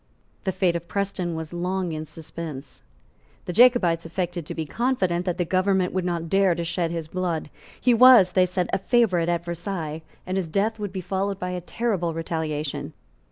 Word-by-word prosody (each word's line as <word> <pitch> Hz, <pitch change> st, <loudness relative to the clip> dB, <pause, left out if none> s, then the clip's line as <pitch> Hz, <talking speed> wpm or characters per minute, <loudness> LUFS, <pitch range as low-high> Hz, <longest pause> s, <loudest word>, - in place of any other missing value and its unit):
The 190 Hz, -, +1 dB
fate 180 Hz, -2 st, +1 dB
of 170 Hz, 0 st, -4 dB
Preston 190 Hz, -3 st, -2 dB
was 160 Hz, 0 st, -6 dB
long 180 Hz, +1 st, -2 dB
in 155 Hz, 0 st, -5 dB
suspense. 155 Hz, -3 st, -8 dB, 0.6 s
The 180 Hz, -, -4 dB
Jacobites 205 Hz, -8 st, +5 dB
affected 175 Hz, -1 st, -3 dB
to -, -, -5 dB
be 160 Hz, -, -3 dB
confident 185 Hz, -, 0 dB
that 180 Hz, -1 st, 0 dB
the 175 Hz, -, 0 dB
government 185 Hz, +1 st, +1 dB
would 185 Hz, -1 st, -1 dB
not 170 Hz, -2 st, -2 dB
dare 195 Hz, 0 st, +3 dB
to 170 Hz, -, -3 dB
shed 170 Hz, 0 st, -1 dB
his 165 Hz, -2 st, -4 dB
blood. 170 Hz, -3 st, -3 dB, 0.3 s
He 250 Hz, -, +4 dB
was, 235 Hz, -6 st, +8 dB
they 185 Hz, 0 st, +3 dB
said, 180 Hz, 0 st, -2 dB
a -, -, +2 dB
favourite 190 Hz, -6 st, +2 dB
at 170 Hz, 0 st, -1 dB
Versailles, 170 Hz, -2 st, -4 dB, 0.2 s
and 185 Hz, +1 st, -2 dB
his 185 Hz, -3 st, -1 dB
death 210 Hz, +7 st, 0 dB
would 205 Hz, -2 st, -4 dB
be 190 Hz, -1 st, -4 dB
followed 195 Hz, +2 st, -2 dB
by 180 Hz, -1 st, -4 dB
a 180 Hz, -1 st, -3 dB
terrible 180 Hz, -4 st, -1 dB
retaliation. 155 Hz, -3 st, -3 dB
175 Hz, 190 wpm, -24 LUFS, 165-190 Hz, 0.6 s, was